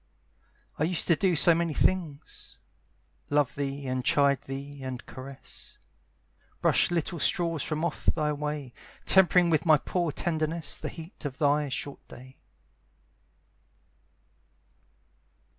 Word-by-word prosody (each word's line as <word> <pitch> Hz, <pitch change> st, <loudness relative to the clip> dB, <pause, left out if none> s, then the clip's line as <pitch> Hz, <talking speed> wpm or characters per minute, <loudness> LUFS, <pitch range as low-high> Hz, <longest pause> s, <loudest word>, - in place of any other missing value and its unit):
I 150 Hz, -, +2 dB
used 175 Hz, 0 st, 0 dB
to 170 Hz, -, +6 dB
do 185 Hz, 0 st, +1 dB
so 170 Hz, +2 st, +6 dB
many 165 Hz, -2 st, -1 dB
things, 160 Hz, -6 st, -2 dB, 0.7 s
Love 145 Hz, -2 st, +2 dB
thee 140 Hz, 0 st, -4 dB
and 130 Hz, -1 st, -2 dB
chide 140 Hz, 0 st, +3 dB
thee 140 Hz, +1 st, -7 dB
and 130 Hz, -2 st, -6 dB
caress; 135 Hz, +1 st, -11 dB, 0.8 s
Brush -, -, +3 dB
little 170 Hz, 0 st, -2 dB
straws 165 Hz, -4 st, +1 dB
from 155 Hz, +1 st, -2 dB
off 170 Hz, -, -5 dB
thy 150 Hz, -2 st, +1 dB
way, 150 Hz, -3 st, -4 dB, 0.3 s
Tempering 180 Hz, -2 st, +5 dB
with 155 Hz, -, +2 dB
my 155 Hz, -3 st, +6 dB
poor 170 Hz, +2 st, -2 dB
tenderness 160 Hz, -1 st, -2 dB
The -, -, -5 dB
heat 165 Hz, +2 st, -11 dB
of 140 Hz, -3 st, -5 dB
thy 145 Hz, -1 st, +2 dB
short 140 Hz, +2 st, -6 dB
day. 130 Hz, +1 st, -13 dB
150 Hz, 125 wpm, -28 LUFS, 140-170 Hz, 0.8 s, to